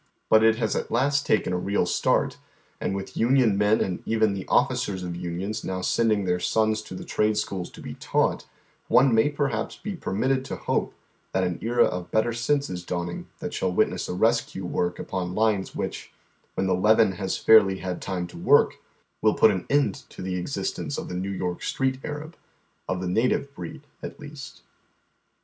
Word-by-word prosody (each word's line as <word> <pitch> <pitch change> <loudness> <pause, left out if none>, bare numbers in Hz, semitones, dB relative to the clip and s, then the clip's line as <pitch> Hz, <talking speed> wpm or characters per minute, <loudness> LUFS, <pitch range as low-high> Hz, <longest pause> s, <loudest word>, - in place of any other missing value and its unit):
But 110 - +7
it 110 0 +5
has 110 -2 -1
at - - -2
last 140 +4 +1
taken 95 -4 +2
a 90 - 0
real 100 +3 0
start, - - +1 0.4
and 95 - -2
with 95 0 -6
union 120 -3 +3
men 105 +2 +3
and 90 -2 -2
even 110 -2 +2
the 95 -1 -5
officers 95 -3 +1
of 90 -1 -4
unions 90 +4 -4
now 95 0 -3
send 115 +4 +2
ing 100 -2 +1
their 90 -1 +1
sons 110 +2 +1
to 100 - -9
the - - -7
trade 105 0 +1
schools 95 -4 -3
to - - -13
be - - -6
taught,* - - 0 0.4
one 130 -1 +5
may 110 +6 +4
perhaps 140 -6 -2
be 205 -2 -6
permitted 130 - 0
to - - -4
hope - - -2 0.4
that 95 - +2
an 90 -2 -2
era 120 +1 +3
of 90 -1 -3
better 110 +2 +1
sense 140 +5 0
is 90 -1 -5
dawning 85 -1 -4
that - - -5
shall 95 - 0
witness - - 0
a - - -2
rescue 115 -2 +1
work 90 0 -1
upon 90 -1 -4
lines 105 -3 +1
which, - - -4 0.4
when 95 - 0
the 95 - +2
leaven 105 +3 +4
has 95 +1 -3
fairly 100 -4 +6
had 90 -1 -4
time 90 -3 -3
to 85 -1 -10
work, - - +4 0.4
will 110 0 +3
put 110 - +6
an 95 -3 -3
end 140 -8 +3 0.2
to - - -9
the 95 0 -3
existence 90 -1 -3
of - - -5
the 90 - -4
New 95 +2 -2
York 90 -2 -3
Street 130 -1 -1
Arab, 150 +3 -6 0.5
of 95 -1 -1
the 90 - -2
native 125 +8 +1
breed 150 +1 -8 0.2
at - - -7
least. 150 -2 -10
105 Hz, 195 wpm, -25 LUFS, 90-115 Hz, 0.5 s, But